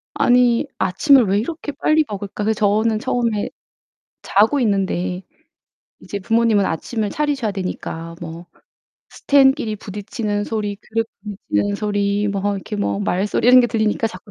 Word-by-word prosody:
'아니 245 +2 +3
아침을 265 +7 +4
왜 195 +2 +2
이렇게 305 +6 -4
빨리 310 +2 +2
먹을까?' 205 0 -5
그래서 220 0 0 0.2
저는 225 -1 +1
처음에 235 -3 -1 0.7
자고 220 +8 +2
있는데 195 -5 -1 0.8
이제 200 - -6
부모님은 225 0 +2
아침을 210 +5 -2
차리셔야 285 -8 -1
되니까 165 -3 -5
뭐 170 0 -8 0.6
스탠끼리 270 -5 +2
부딪히는 205 +1 -4
소리 210 -2 -3
그릇 225 +2 -3 0.2
부딪치는 205 0 -2
소리 205 0 0
뭐 200 -1 -2
이렇게 200 +2 -6
뭐 205 -1 -1
말소리 205 +2 0
이런 255 +1 +8
게 240 - +3
들리니까 225 -1 0
자꾸 225 -1 -10
210 Hz, 330 characters per minute, -20 LUFS, 200-240 Hz, 0.8 s, 이런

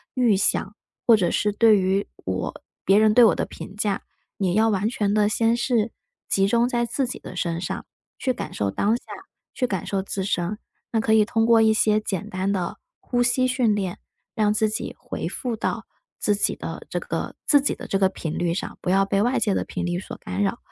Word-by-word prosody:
预 240 -6 +4
想。 195 +1 0 0.3
或 230 - +8
者 185 -5 +1
是 210 - +1
对 215 +1 +5
于 190 +2 +1 0.2
我 - - -3 0.2
别 195 - +4
人 215 0 +5
对 240 +1 +7
我 200 - +4
的 - - -1
评 180 +4 -10
价。 205 -2 -1 0.4
你 185 -3 0
要 225 +1 +4
完 205 0 +1
全 210 -5 0
的 210 0 +3
先 230 +2 +2
是 235 -2 +1 0.4
集 195 0 +2
中 235 +3 +3
在 240 -1 0
自 260 +3 -1
己 245 - -6
的 - - -10
身 170 -1 -2
上， 175 - -4 0.3
去 260 - 0
感 - - -6
受 100 -1 -1
当 205 - +1
下， - - -18 0.5
去 250 - 0
感 190 -5 -3
受 195 -1 -1
自 195 0 -4
身。 180 +1 -1 0.3
那 225 - +1
可 220 0 +2
以 220 -1 +6
通 225 +1 +1
过 230 -1 +5
一 220 - +5
些 215 0 +3
简 195 -5 -3
单 185 +1 -2
的 185 -3 -2 0.2
呼 245 -1 -1
吸 245 +1 +3
训 250 -4 +2
练， 195 -1 -3 0.3
让 210 -1 +2
自 215 +1 +2
己 215 - -4
恢复 245 -4 -4
到 225 +1 -3 0.3
自 205 - +1
己 205 - +1
的 - - -7
这 - - -2
个 - - -4
自 285 -2 +5
己 285 - 0
的 - - -9
这 195 - 0
个 190 - +4
频 165 -4 -5
率 175 -1 +1
上， 170 - -4
不 - - -3
要 195 +1 +4
被 195 0 +1
外 245 +4 +2
界 210 -3 +1
的 - - 0
频 180 -1 -4
率 175 0 -1
所 - - -8
干 - - -4
扰。 205 +3 0
210 Hz, 245 characters per minute, -24 LUFS, 195-230 Hz, 0.5 s, 或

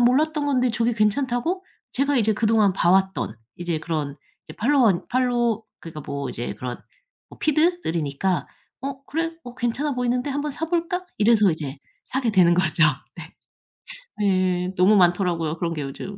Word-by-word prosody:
몰랐던 295 +5 +3
건데 255 -3 +2
저게 230 +1 +1
괜찮다고?' 245 - 0 0.3
제가 280 +2 +1
이제 220 -1 +3
그동안 215 -2 +3
봐 175 -2 +2
왔던 190 - +1 0.3
이제 175 -2 -1
그런 155 -4 -3 0.3
이제 - - -11
팔로원 235 -6 +3
팔로 240 -3 +1 0.2
그러니까 160 -2 -8
뭐 140 -1 -4
이제 120 -3 -4
그런 120 +3 -6 0.5
어 - - -14
피드들이니까 190 - 0 0.4
'어 275 0 -5
그래? 330 +3 -2
어 245 -4 -10
괜찮아 255 +4 -1
보이는데 250 +2 0
한번 290 +2 -2
사 315 +3 -4
볼까?' 345 +2 -1
이래서 210 -2 +5
이제 145 -4 -5 0.3
사게 255 -3 -1
되는 180 -4 +5
거죠. 170 -2 +3 0.3
네. 170 -1 -10 0.9
네. 185 -2 +1
너무 185 +4 +5
많더라고요 175 -3 +2
그런 170 0 -2
게 150 - -4
요즘. 145 +9 -7
215 Hz, 330 characters per minute, -23 LUFS, 175-265 Hz, 0.9 s, 이래서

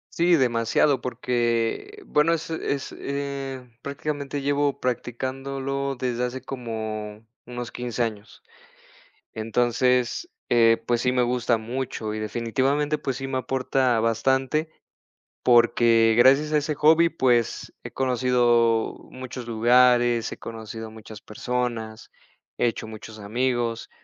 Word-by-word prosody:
Sí, 170 0 +4
demasiado, 125 +1 +2
porque, 120 - -1
bueno, 150 +3 +3
es 165 0 -4
es, 140 -3 -3
eh, 140 -2 -4
prácticamente, 140 0 -4
llevo 145 0 +1
practicándolo 135 +3 -3
desde 125 -1 -1
hace 125 +1 -3
como 110 -4 -6 0.2
unos 120 -1 -6
15 120 -1 -2
años. 105 -2 -6 0.9
Entonces, 120 - +1 0.2
eh, 115 -1 +4
pues 120 -1 +1
sí 125 0 +2
me 125 -1 +2
gusta 120 -1 +1
mucho 115 -1 -4
y, 110 - -4
definitivamente, 130 +7 0
pues 135 -2 -3
sí 135 - -5
me 130 -1 -1
aporta 130 -2 +1
bastante, 130 +7 +1 0.7
porque 115 -2 +5
gracias 135 +5 +5
a - - +5
ese 150 +1 0
hobby, 160 +3 +5
pues, 120 -7 0
he - - -6
conocido 120 -3 +2 0.2
muchos 130 -1 -8
lugares, 120 0 +3
he - - -7
conocido 110 0 -7
muchas 110 -1 -11
personas, 115 -1 -4 0.5
he 120 - +2
hecho 110 - -5
muchos 110 0 -10
amigos 120 +2 -2
125 Hz, 120 wpm, -24 LUFS, 115-135 Hz, 0.9 s, porque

